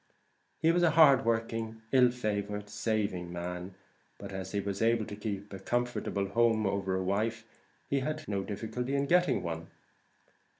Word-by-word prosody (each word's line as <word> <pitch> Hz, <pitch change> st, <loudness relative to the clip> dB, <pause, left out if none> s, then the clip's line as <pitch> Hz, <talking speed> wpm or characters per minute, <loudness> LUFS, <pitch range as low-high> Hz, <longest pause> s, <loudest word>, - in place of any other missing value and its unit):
He 165 Hz, 0 st, +3 dB
was 175 Hz, +1 st, +2 dB
a 175 Hz, -, +5 dB
hard 145 Hz, -5 st, +6 dB
working, 115 Hz, -1 st, -1 dB
ill 125 Hz, -2 st, +6 dB
favoured, 105 Hz, -3 st, -3 dB
saving 105 Hz, -5 st, -1 dB
man; 90 Hz, +1 st, -5 dB, 0.4 s
but, -, -, -8 dB
as 95 Hz, -1 st, -5 dB
he 100 Hz, -, 0 dB
was 100 Hz, 0 st, -3 dB
able 115 Hz, -1 st, +3 dB
to 105 Hz, -, -7 dB
keep 100 Hz, -1 st, -5 dB
a 95 Hz, -, -6 dB
comfortable 120 Hz, -2 st, -1 dB
home 115 Hz, 0 st, +3 dB
over 95 Hz, -1 st, 0 dB
a 95 Hz, -, -1 dB
wife, 110 Hz, +4 st, -1 dB, 0.4 s
he 140 Hz, -, +1 dB
had 155 Hz, +3 st, -3 dB
no 100 Hz, -2 st, -1 dB
difficulty 115 Hz, +6 st, -3 dB
in 140 Hz, 0 st, +1 dB
getting 180 Hz, +4 st, +3 dB
one. 85 Hz, -1 st, -4 dB
110 Hz, 165 wpm, -31 LUFS, 100-120 Hz, 0.4 s, hard